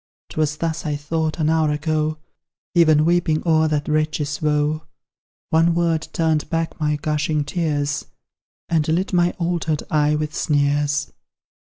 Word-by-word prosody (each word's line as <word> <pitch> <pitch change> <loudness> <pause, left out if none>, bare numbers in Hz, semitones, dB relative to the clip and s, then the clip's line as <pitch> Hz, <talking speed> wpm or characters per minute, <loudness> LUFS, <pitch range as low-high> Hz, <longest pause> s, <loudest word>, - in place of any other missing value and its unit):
'Twas 150 -1 -1
thus 165 -1 -2
I 150 -2 -1
thought, 155 +2 -2
an 155 -2 +1
hour 160 -1 +2
ago, 155 +1 -1 0.6
Even 155 -3 +5
weeping 170 -2 +2
o'er 160 -1 +3
that 150 -1 -1
wretch's 155 -1 -1
woe; 150 0 0 0.7
One 165 +1 +3
word 165 -2 +1
turned 160 -2 0
back 165 0 -2
my 150 -1 +1
gushing 150 0 -1
tears, 145 -2 -1 0.6
And 160 -2 +1
lit 180 +5 0
my 175 -1 +4
altered 170 -3 -1
eye 150 0 +3
with 150 0 -3
sneers. 145 0 +1
155 Hz, 140 wpm, -21 LUFS, 150-165 Hz, 0.7 s, Even